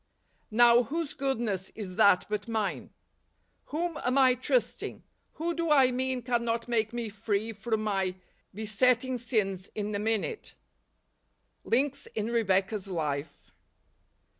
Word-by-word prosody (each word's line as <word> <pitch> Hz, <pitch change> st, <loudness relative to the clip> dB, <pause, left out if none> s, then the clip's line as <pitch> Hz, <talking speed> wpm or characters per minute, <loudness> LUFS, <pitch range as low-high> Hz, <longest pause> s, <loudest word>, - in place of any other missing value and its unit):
Now, 240 Hz, +2 st, +6 dB
whose 315 Hz, +4 st, -3 dB
goodness 230 Hz, -9 st, -2 dB
is 195 Hz, -4 st, -6 dB
that 190 Hz, -1 st, +5 dB
but 210 Hz, 0 st, -3 dB
mine? 220 Hz, -3 st, -2 dB, 0.8 s
Whom 330 Hz, +1 st, -3 dB
am 250 Hz, +2 st, +1 dB
I 260 Hz, -2 st, +6 dB
trusting? 255 Hz, -, -1 dB, 0.3 s
Who 335 Hz, +2 st, -2 dB
do 335 Hz, -1 st, -2 dB
I 270 Hz, -4 st, +5 dB
mean 255 Hz, 0 st, -1 dB
cannot 235 Hz, -1 st, -1 dB
make 225 Hz, -2 st, 0 dB
me 240 Hz, -1 st, -3 dB
free 215 Hz, +1 st, -2 dB
from 220 Hz, +1 st, -2 dB
my 195 Hz, -3 st, 0 dB, 0.4 s
besetting 245 Hz, +5 st, +1 dB
sins 200 Hz, -6 st, -1 dB
in 210 Hz, 0 st, -3 dB
a 205 Hz, -, -1 dB
minute? 225 Hz, -, -2 dB, 1.1 s
Links 280 Hz, +3 st, 0 dB
in 220 Hz, +1 st, -1 dB
Rebecca's 195 Hz, -2 st, +1 dB
Life. 150 Hz, -5 st, -4 dB
225 Hz, 125 wpm, -29 LUFS, 205-255 Hz, 1.1 s, Now